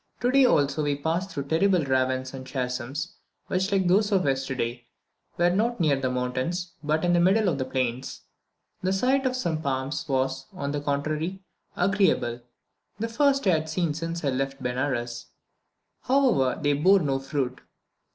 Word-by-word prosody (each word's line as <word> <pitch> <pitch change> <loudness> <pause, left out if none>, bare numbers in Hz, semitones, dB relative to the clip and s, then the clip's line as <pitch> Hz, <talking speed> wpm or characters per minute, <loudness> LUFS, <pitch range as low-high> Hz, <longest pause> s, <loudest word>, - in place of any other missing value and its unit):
Today 260 +2 +4
also 145 - +2
we 145 -1 0
passed 165 +6 -2
through 140 - -4
terrible 165 +3 +2
ravines 130 0 0
and 130 -1 -7
chasms, 130 +1 -4 0.3
which 190 +2 -1
like 190 -2 +2
those 205 +4 +3
of 190 -2 +2
yesterday, 130 -3 -2 0.5
were 175 0 +3
not 225 +5 0
near 155 -5 +3
the 135 -1 -1
mountains, 130 +8 -2
but 155 +2 0
in 175 - +3
the 175 - +4
middle 195 +4 +4
of 150 -6 0
the 130 - -1
plains. 130 -1 -3 0.6
The 185 +1 0
sight 260 +6 +2
of 255 - -1
some 170 -11 -1
palms 135 0 -2
was, 135 0 -1
on 140 -6 -3
the 145 0 -2
contrary, 155 +6 -2 0.3
agreeable, 180 - +1 0.6
the 230 - -2
first 275 +2 +2
I 190 - +5
had 160 -1 0
seen 160 -1 0
since 165 +1 -4
I - - +2
left 135 +1 -3
Benares; 125 -2 -2 0.7
however, 250 - +2
they 145 -2 +2
bore 185 +7 +4
no 135 -3 0
fruit. 135 -2 -3
150 Hz, 165 wpm, -26 LUFS, 130-185 Hz, 0.7 s, I